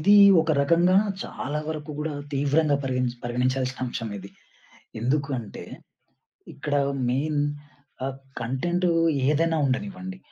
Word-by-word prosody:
ఇది 200 +6 +5 0.3
ఒక 160 0 0
రకంగా 170 +5 +4 0.3
చాలా 145 +3 -4
వరకు 155 -1 -4
గూడా 155 +1 -2 0.2
తీవ్రంగా 145 +2 +2
పరిగణి 125 -2 -1
పరిగణించాల్సిన 125 +2 -1
అంశం 115 -3 -4
ఇది. 100 +1 -10 0.7
ఎందుకు 140 +4 0
అంటే? 110 - -9 0.9
ఇక్కడ 145 0 -3 0.3
మెయిన్ 145 +4 0 0.7
ఆహ్, 135 0 -4 0.2
కంటెంట్ 175 +10 0 0.4
ఏదైనా 160 +2 +2
ఉండనివ్వండి. 185 +7 -3
145 Hz, 110 wpm, -25 LUFS, 130-160 Hz, 0.9 s, ఇది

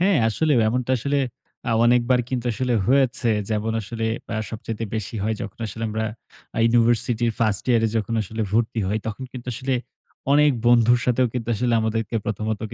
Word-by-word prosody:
হ্যাঁ, 190 -1 +4
আসলে 155 +7 +1 0.2
এমনটা 125 +2 0
আসলে 140 +4 0 0.5
আ - - +1
অনেকবার 125 +1 +4
কিন্তু 125 -2 -2
আসলে 125 +1 -1
হয়েছে। 130 -2 +2 0.2
যেমন 110 +1 0
আসলে 110 +2 -4 0.3
আ - - -1
সবচাইতে 115 0 -5
বেশি 110 0 -4
হয় 110 +2 0
যখন 100 - -8
আসলে 110 +2 -5
আমরা 110 +1 -2 0.5
আ - - -1
ইউনিভার্সিটি 120 0 +2
ফার্স্ট 110 -4 +1
ইয়ার 120 -2 +4
এ - - +1
যখন 110 +1 -1
আসলে 110 +3 -4
ভর্তি 115 +1 +1
হই 105 +2 0
তখন 110 +4 -4
কিন্তু 125 -1 -9
আসলে 130 +3 -1 0.6
অনেক 150 +1 +6 0.2
বন্ধুর 120 0 +5
সাথেও 125 0 +2
কিন্তু 120 -1 -3
আসলে 120 +2 +1
আমাদেরকে 110 0 -2
প্রথমত 110 0 -2
115 Hz, 175 wpm, -23 LUFS, 110-125 Hz, 0.6 s, অনেক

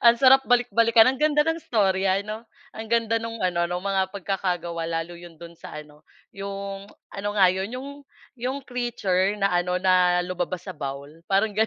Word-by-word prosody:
Ang 235 - +8
sarap 265 +1 +6
balik-balikan, 230 -2 +4
ang 265 - -6
ganda 300 0 +3
ng 325 +1 -1
istorya 195 - +1
ano, 215 +2 -7 0.2
ang 220 -3 -8
ganda 230 0 +1
nung 230 -2 -6
ano 175 -2 +1
nong 175 +1 -4
mga 195 -1 +1
pagkakagawa 175 -4 -2
lalo 165 +1 -4
'yon 175 -1 -12
do'n 170 0 -12
sa - - -10
ano, 150 0 -12 0.2
'yong 195 0 -6 0.3
ano 205 +1 -4
nga 195 -3 +6
'yon, 190 +2 -3
'yong 270 +2 -6 0.5
'yong 255 +3 -2
creature 210 -7 -1
na 195 -1 0
ano, 180 0 0
na 180 -1 +4
lumabas 180 0 -4
sa - - -6
bowl, 140 -1 -6 0.2
parang 195 +3 +2
ganon. 215 +2 +1
195 Hz, 180 wpm, -24 LUFS, 180-230 Hz, 0.5 s, Ang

